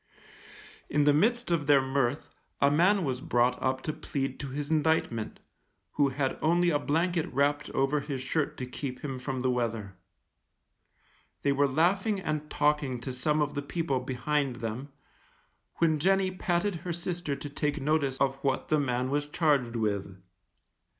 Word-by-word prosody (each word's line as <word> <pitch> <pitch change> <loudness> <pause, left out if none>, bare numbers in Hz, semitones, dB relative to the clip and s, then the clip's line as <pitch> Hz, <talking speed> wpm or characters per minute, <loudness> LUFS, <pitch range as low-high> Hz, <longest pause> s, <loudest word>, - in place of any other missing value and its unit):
In 150 - +2
the 145 0 +5
midst 235 +7 +2
of 155 -4 +1
their 145 -2 +7
mirth, 135 0 -1 0.3
a 140 - +4
man 185 +6 +4
was 130 -4 -2
brought 125 +1 +1
up 130 0 0
to 155 - -2
plead 135 -3 -3
to 140 - -4
his 145 +3 -4
indictment, 155 -8 0 0.5
who 145 -2 +2
had 135 0 -2
only 175 +2 +3
a 145 - +2
blanket 165 +3 0
wrapped 145 +2 +1
over 135 +2 +1
his 140 -1 -4
shirt 140 +3 -1
to 130 - -4
keep 125 0 -6
him 135 -3 -4
from 130 0 -3
the 130 0 +2
weather; 115 -5 -2 1.5
they 140 - +3
were 140 +1 +3
laughing 190 +9 +2
and 155 -4 -3
talking 145 -4 +1
to 130 +1 -5
some 150 +4 +1
of 145 0 -3
the 145 - -2
people 145 -2 -1
behind 130 +2 -1
them, 120 +4 -5 0.9
when 160 -2 +2
Jenny 190 +3 +2
patted 180 +1 0
her 175 +1 -4
sister 175 -3 -3
to 140 - -7
take 150 +1 -1
notice 140 -2 +1
of 135 0 +1
what 135 -1 -1
the 155 - +3
man 125 -2 -1
was 145 0 0
charged 145 -6 +1
with. 100 -4 -2
145 Hz, 165 wpm, -29 LUFS, 130-155 Hz, 1.5 s, their